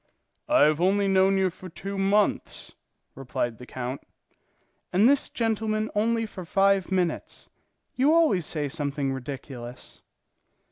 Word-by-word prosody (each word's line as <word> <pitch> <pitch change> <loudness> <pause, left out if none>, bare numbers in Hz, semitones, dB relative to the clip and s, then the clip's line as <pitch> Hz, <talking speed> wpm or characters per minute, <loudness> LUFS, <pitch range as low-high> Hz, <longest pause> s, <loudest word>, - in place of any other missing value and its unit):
"I 305 - +5
have 155 +2 +3
only 195 +2 +3
known 195 0 +4
you 190 -1 +2
for 185 +1 -11
two 195 +4 -6
months," 195 +1 0 0.4
replied 120 -3 -3
the 125 - -11
count. 130 +1 -5 0.9
"And 200 +6 +5
this 280 +1 +3
gentleman 220 -1 -1
only 225 +2 +1
for 195 -4 -8
five 195 +2 +2
minutes. 180 -3 -2 0.4
You 270 +4 +3
always 310 - +3
say 150 -3 -2
something 140 -2 -2
ridiculous." 130 -2 -8
190 Hz, 130 wpm, -26 LUFS, 145-210 Hz, 0.9 s, I